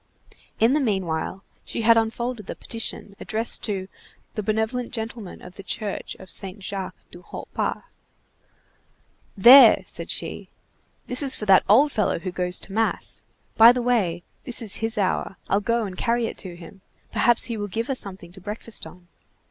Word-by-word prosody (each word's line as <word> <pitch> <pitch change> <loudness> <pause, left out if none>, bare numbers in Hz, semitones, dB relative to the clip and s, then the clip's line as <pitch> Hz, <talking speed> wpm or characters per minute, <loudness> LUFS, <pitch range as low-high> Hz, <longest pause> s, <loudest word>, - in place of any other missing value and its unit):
'" - - -27
In 230 +4 +4
the 300 - +3
meanwhile 190 - -2 0.2
she 230 - -4
had 230 +1 +6
unfolded 225 0 -1
the - - -5
petition 225 -3 -6
addressed 225 +2 -2
to 195 -3 -3 0.5
"the 215 - -3
benevolent 220 +4 -1
gentleman 225 -4 -6
of 180 +1 -12
the - - -7
church 205 +1 -4
of 190 - -13
Saint 195 +1 -4
Jacques 190 0 -5 0.2
du 175 - -12
Haut - - -9
Pas." - - -2 1.6
"Here!" 245 +3 +9
said - - -9
she, - - -5 0.6
"this 250 +2 0
is 270 -2 +4
for 210 - -5
that 195 -2 +6
old 275 +8 +6
fellow 215 -5 0
who 185 +2 -5
goes 180 0 -2
to 195 - -9
mass. 225 +1 +1 0.4
By 225 +1 +10
the 245 0 -1
way, 190 -9 +1 0.2
this 245 - -3
is 210 - 0
his 225 0 -2
hour. 190 -1 -1
I'll 200 - +2
go 230 +2 0
and 190 -2 -6
carry 235 +4 0
it - - -6
to 180 -3 -7
him. 180 +3 -13 0.3
Perhaps 240 -1 +3
he 235 - -1
will 205 -1 -4
give 225 +4 -3
us 270 -2 0
something 190 -3 -3
to 190 +1 -14
breakfast 210 -1 -2
on." 175 +2 -16
215 Hz, 180 wpm, -24 LUFS, 190-230 Hz, 1.6 s, By